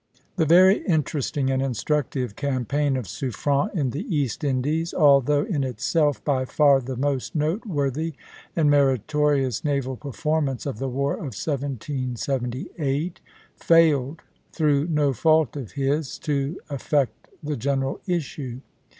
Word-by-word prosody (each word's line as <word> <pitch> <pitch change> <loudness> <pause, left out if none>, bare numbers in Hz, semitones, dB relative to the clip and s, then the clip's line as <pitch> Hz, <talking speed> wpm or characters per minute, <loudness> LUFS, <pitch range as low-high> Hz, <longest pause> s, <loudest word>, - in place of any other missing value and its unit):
The 160 -3 +2
very 185 +5 +6
interesting 145 -4 0
and 130 0 +1
instructive 135 -2 -1
campaign 140 +1 0
of 125 - -4
Suffren 140 - -1
in 140 -7 0
the 145 +9 -4
East 150 - -2
Indies, 145 +5 0
although 145 -1 +4
in 175 -10 -1
itself 140 +4 0
by 135 -3 +1
far 140 +1 +4
the 130 +1 -5
most 135 +2 -2
noteworthy 155 - -1 0.4
and 160 -3 +3
meritorious 140 -1 +2
naval 140 -3 -1
performance 145 0 -2
of 135 -7 -4
the 135 - -2
war 140 +3 0
of 130 -9 -6
1778, 135 - -3 0.4
failed, 160 -3 +3 0.3
through 150 -2 +1
no 150 -4 +2
fault 155 +3 +3
of 130 -9 -7
his, 140 +1 -1
to 145 +2 -2
affect 140 -5 -1 0.2
the 150 0 -2
general 135 +2 -1
issue. 140 -7 -3
140 Hz, 125 wpm, -24 LUFS, 130-150 Hz, 0.4 s, very